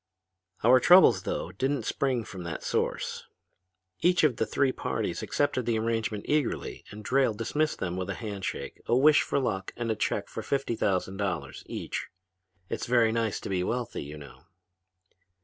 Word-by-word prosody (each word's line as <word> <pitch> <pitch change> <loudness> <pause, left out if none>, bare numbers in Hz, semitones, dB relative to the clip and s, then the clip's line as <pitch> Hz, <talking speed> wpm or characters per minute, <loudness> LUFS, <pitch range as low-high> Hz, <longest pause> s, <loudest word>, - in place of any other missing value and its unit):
"Our 125 +3 +7
troubles, 125 - +7
though, 90 - -3
didn't 130 +6 -1
spring 130 -4 0
from 95 -3 -8
that 85 -2 -5
source. - - -2 0.7
Each 180 0 +3
of 140 -7 +3
the 110 - 0
three 140 -2 +2
parties - - -3
accepted 130 -4 0
the 115 -2 +2
arrangement 110 -2 -1
eagerly 150 -4 -1
and 105 0 -10
Drayle 130 -2 +2
dismissed 150 +8 0
them 90 0 -3
with 90 -1 -3
a - - -2
hand 105 -4 -6
shake, - - -5
a 120 - +3
wish 150 +3 +6
for - - -1
luck 95 -8 -1
and 120 -1 -1
a - - 0
check 110 - -1
for - - -6
fifty 135 -4 -1
thousand 95 -2 0
dollars 100 -3 -3
each. - - -4 0.6
It's - - -4
very 120 -2 +4
nice 115 -2 0
to - - -6
be 90 -2 0
wealthy, 120 +3 -2
you 75 +2 -8
know. 75 -2 -13
115 Hz, 175 wpm, -28 LUFS, 95-130 Hz, 0.7 s, Our